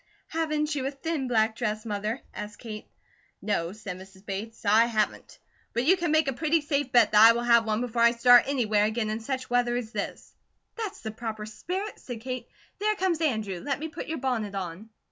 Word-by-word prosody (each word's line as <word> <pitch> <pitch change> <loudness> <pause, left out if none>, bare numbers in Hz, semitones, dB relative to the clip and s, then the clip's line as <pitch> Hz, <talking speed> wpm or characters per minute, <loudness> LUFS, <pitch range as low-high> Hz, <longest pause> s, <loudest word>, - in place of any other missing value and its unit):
"Haven't 305 -1 -1
you 280 -3 -2
a - - 0
thin 290 0 -3
black 220 -2 +2
dress, 215 -2 -2
Mother?" 210 +3 -3
asked 210 0 -7
Kate. 215 -3 -8 0.5
"No," 170 -5 -1
said 200 -3 -7
Mrs. 190 +1 -15
Bates, 215 +3 -6
"I 215 +3 +6
haven't; 220 -3 -2 0.4
but 240 +2 0
you 365 +6 +6
can 345 -3 -2
make 310 -1 +3
a 270 - +1
pretty 315 +4 +1
safe 290 -3 -1
bet 235 -4 +5
that 210 0 +6
I 225 +1 +10
will 235 +1 -2
have 235 -1 +5
one 215 +1 0
before 240 -1 -1
I 235 - +8
start 245 +1 +6
anywhere 220 -7 +2
again 220 0 -1
in 215 - -2
such 260 +3 -4
weather 245 0 +2
as 240 -3 -3
this." - - -5 0.4
"That's 430 -3 -5
the 220 - -4
proper 220 -1 -5
spirit," 370 - -5
said 240 -3 -7
Kate. 255 0 -5 0.3
"There 425 +1 +1
comes 360 -4 0
Andrew. 220 - -1
Let 275 +9 -2
me 320 +2 -5
put 310 +2 -7
your 320 - -3
bonnet 230 -6 -2
on." 190 +3 -5
235 Hz, 210 wpm, -27 LUFS, 215-285 Hz, 0.5 s, I